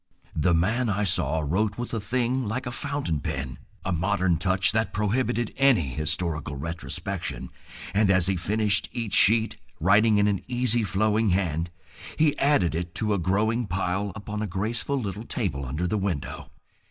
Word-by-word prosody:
The 85 +3 +3
man 110 +8 +1
I 105 +1 0
saw 80 -4 +1
wrote 100 +7 0
with 120 0 -5
a 115 - 0
thing 125 +4 0
like 115 +5 -3
a 120 - -3
fountain 140 - -2
pen, 65 -1 -4 0.3
a 95 - 0
modern 95 0 +1
touch 95 +3 +2
that 110 -3 0
prohibited 120 +3 0
any 125 - +4
historical 75 +1 -2
retrospection, 80 -1 -4 0.4
and 100 0 +3
as 95 -2 +4
he 95 0 +1
finished 100 +2 +1
each 115 -4 -3
sheet, 110 +1 +4 0.2
writing 105 +5 +4
in 100 0 +4
an 100 -2 0
easy 120 -2 +1
flowing 105 +2 +1
hand, 85 -3 0 0.5
he 155 -2 +3
added 140 - +3
it 85 +1 -4
to 105 -2 0
a 100 - 0
growing 110 +6 +1
pile 95 +2 -1
upon 105 0 -5
a 110 - -1
graceful 115 +9 -2
little 105 -2 -4
table 70 0 -2
under 75 +7 -2
the 105 +4 0
window. 95 -8 -3
100 Hz, 165 wpm, -26 LUFS, 85-115 Hz, 0.5 s, any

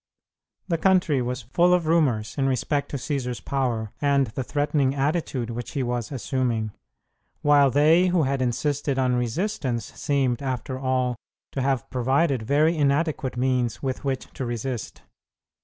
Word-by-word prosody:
The 165 -3 0
country 180 -6 +3
was 125 0 -3
full 175 +9 +3
of 175 -2 -1
rumors 140 -10 +1
in 135 -2 +1
respect 140 +3 0
to 140 - -3
Cćsar's 125 -3 -3
power, 120 -6 -2
and 140 -1 +3
the 125 +3 -5
threatening 145 0 0
attitude 140 -4 -1
which 120 +1 -6
he 140 - -1
was 120 -1 -2
assuming, 125 -4 -1 0.7
while 145 -2 +5
they 155 +7 +4
who 175 -3 +2
had 135 -1 0
insisted 135 +3 0
on 130 -1 +2
resistance 125 - -2
seemed, 135 -4 0
after 130 -1 -3
all, 130 -2 0 0.3
to 135 - -2
have 135 -2 0
provided 130 +2 +1
very 150 +8 +2
inadequate 145 -3 0
means 125 -2 0
with 130 0 -3
which 135 -2 -2
to 135 - -5
resist. 120 -1 -4
135 Hz, 150 wpm, -25 LUFS, 125-145 Hz, 0.7 s, while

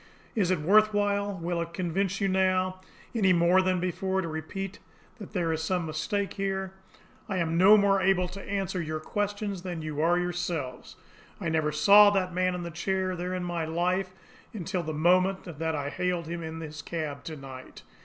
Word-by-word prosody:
"Is 195 -6 +1
it 185 -3 +2
worth 215 +5 +4
while, 205 0 +1
will 170 0 -2
it 170 0 -6
convince 190 +2 -1
you 200 - +1
now, 185 0 +1 0.3
any 195 -6 +3
more 175 +2 +4
than 185 -1 +1
before, 190 +2 -1
to - - -3
repeat 180 +5 -5 0.4
that 205 0 -10
there 170 -4 0
is 160 - -2
some 175 +1 -1
mistake 175 +6 -2
here? 195 -1 -2 0.6
I 190 - -1
am 165 -2 0
no 195 +5 +7
more 200 -1 +3
able 185 -1 +3
to 195 +2 -8
answer 195 -2 -2
your 155 -1 -3
questions 205 +2 -3
than 175 -3 -5
you 155 -1 -3
are 170 +2 +3
yourselves. 175 -7 -3 0.4
I 170 - -2
never 155 -1 +1
saw 200 +7 +7
that 185 -3 0
man 185 0 +1
in 180 - -4
the 170 - -5
chair 185 +2 -1
there 180 +1 -3
in 180 - -3
my 175 -2 -2
life 180 +4 0 0.5
until 190 -1 -2
the 160 -1 -4
moment 185 +5 +2
that 160 -1 -3
I 145 -1 -3
hailed 180 -1 -1
him 170 +1 -5
in 160 0 -6
his 155 -1 -7
cab 150 -4 -4
to 160 - -5
night. 130 -2 -10
180 Hz, 195 wpm, -28 LUFS, 165-195 Hz, 0.6 s, no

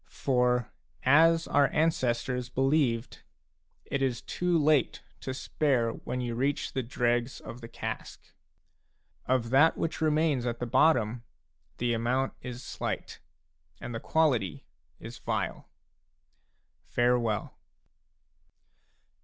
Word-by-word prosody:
For, 125 -3 +1 0.3
as 165 +4 +5
our 145 -1 +4
ancestors 125 -5 0
believed, 135 -3 0 0.6
it 140 - -2
is 130 -2 -1
too 180 -1 0
late 150 -3 +2 0.2
to 130 - -5
spare 130 -3 0
when 125 +2 -5
you 120 -1 -3
reach 135 +4 -1
the 130 - 0
dregs 120 +1 -1
of 120 - -9
the 115 - -8
cask. - - -6 1.1
a 130 - +4
Of 115 -2 -2
that 150 +5 +5
which 165 -1 -3
remains 155 -5 +2
at 120 -1 -2
the 120 - -3
bottom, 120 -3 +3 0.6
the 120 0 0
amount 125 +4 0
is 125 -1 -7
slight, - - -5 0.6
and 120 - -6
the 115 - -3
quality 125 - +1 0.3
is - - -9
vile. - - -3 1.2
Farewell. 120 -3 0
125 Hz, 115 wpm, -29 LUFS, 120-145 Hz, 1.2 s, as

